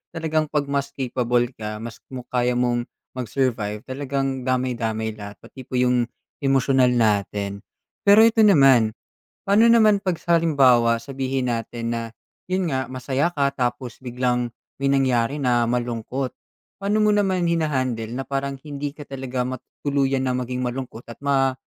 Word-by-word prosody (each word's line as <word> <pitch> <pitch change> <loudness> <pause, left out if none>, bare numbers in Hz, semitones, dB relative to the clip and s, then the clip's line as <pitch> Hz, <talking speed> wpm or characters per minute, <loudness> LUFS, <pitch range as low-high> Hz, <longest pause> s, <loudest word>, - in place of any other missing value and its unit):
talagang 160 -1 0
'pag 145 -1 -1
mas 140 0 -1
capable 120 -2 0
ka, 105 0 -5
mas 115 -1 -8
muk 125 -1 -6
kaya 125 0 +1
mong 120 -1 +1 0.3
mag-survive, 110 -3 -1
talagang 135 -1 -3
damay-damay 115 -4 -1
lahat 100 0 -8
pati 130 -2 -12
po - - -5
'yung 125 -1 +3 0.3
emosyonal 135 -1 +3
natin. 100 -3 0 0.5
Pero 210 +2 +8
ito 230 0 +4
naman, 135 - +5 0.5
paano 220 +4 +5
naman 215 -3 +5
'pag 180 -3 -1
sa 170 -1 +2
halimbawa 130 -8 +4
sabihin 135 -1 -3
natin 115 0 -3
na 115 - -2 0.5
'yun 185 -1 0
nga, 130 -2 -2
masaya 135 +5 -1
ka, 140 -4 +1
tapos 120 -1 -3
biglang 125 -1 -1 0.3
may 140 - +2
nangyari 130 0 +2
na 125 -3 +2
malungkot. 125 +2 -2 0.5
Paano 205 +2 +1
mo 210 0 +4
naman 190 -4 +1
hina-handle 130 -9 0
na 135 - -4
parang 140 0 -3
hindi 145 -1 -4
ka 145 0 -11
talaga 130 -2 -3
mat 130 -1 -5 0.2
tuluyan 135 -2 +1
na 125 - +1
maging 125 0 -3
malungkot 125 -1 -5
at 115 - -9
ma 135 -2 +2
130 Hz, 150 wpm, -23 LUFS, 120-140 Hz, 0.5 s, Pero